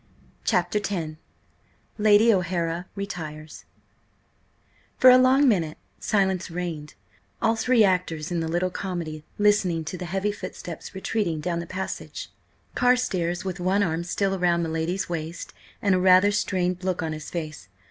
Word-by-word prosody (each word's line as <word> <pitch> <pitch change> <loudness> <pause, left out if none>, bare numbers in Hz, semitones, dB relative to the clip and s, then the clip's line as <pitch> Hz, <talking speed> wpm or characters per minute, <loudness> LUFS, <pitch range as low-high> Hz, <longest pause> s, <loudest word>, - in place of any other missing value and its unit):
CHAPTER 210 - +1
X 175 -7 -3 0.8
LADY 215 +2 +6
O'HARA 175 -1 -1
RETIRES 155 -6 -7 1.3
FOR 255 - +8
a 250 - +8
long 265 +2 +5
minute 170 -9 +1 0.2
silence 190 -3 0
reigned, 165 -3 -5 0.4
all 225 0 +2
three 225 0 +3
actors 180 -4 0
in 175 - 0
the 165 - -2
little 175 +3 0
comedy 170 -5 -4
listening 205 -6 +2
to 180 +4 -5
the 180 - -4
heavy 195 +4 -1
footsteps 185 -3 -8
retreating 190 -4 -1
down 170 +2 -2
the 170 - -6
passage, 190 +2 -5 0.4
Carstares 210 -9 +1
with 185 -1 -4
one 190 +3 +2
arm 165 -2 -1
still 195 +2 -1
around 175 -2 +1
my 165 - -2
lady's 165 +4 -2
waist 165 -1 -5 0.3
and 200 -2 +3
a 185 - +3
rather 185 +2 +6
strained 185 -3 -1
look 185 -2 -1
on 160 -1 -2
his 155 -1 -7
face. 155 - -6
180 Hz, 145 wpm, -25 LUFS, 165-200 Hz, 1.3 s, FOR